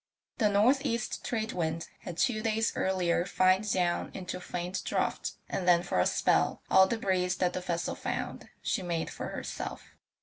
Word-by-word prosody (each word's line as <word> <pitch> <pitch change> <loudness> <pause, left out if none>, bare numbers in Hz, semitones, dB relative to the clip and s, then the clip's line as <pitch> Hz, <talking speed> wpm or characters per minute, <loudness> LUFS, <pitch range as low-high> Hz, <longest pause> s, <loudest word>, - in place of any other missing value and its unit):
The 215 -3 +4
north 235 +8 +4
east 235 -5 -2
trade 220 -2 -2
wind 165 -1 -2
had 170 - -7
two 220 0 +1
days 225 0 +1
earlier 180 -2 +1
fined 185 +2 +2
down 175 -2 +1
into 180 -1 -4
a - - -10
faint 180 +1 -3
draught, - - -1
and 180 - -3
then 175 -1 +5
for 175 - 0
a 90 - +4
spell - - +2
all 190 0 +7
the 230 - -1
breeze 185 -3 +1
that 180 -1 +1
the 185 - -3
vessel 170 -1 -2
found - - -4
she - - 0
made 170 -2 -2
for - - -5
herself. - - -6
185 Hz, 180 wpm, -30 LUFS, 175-215 Hz, -, all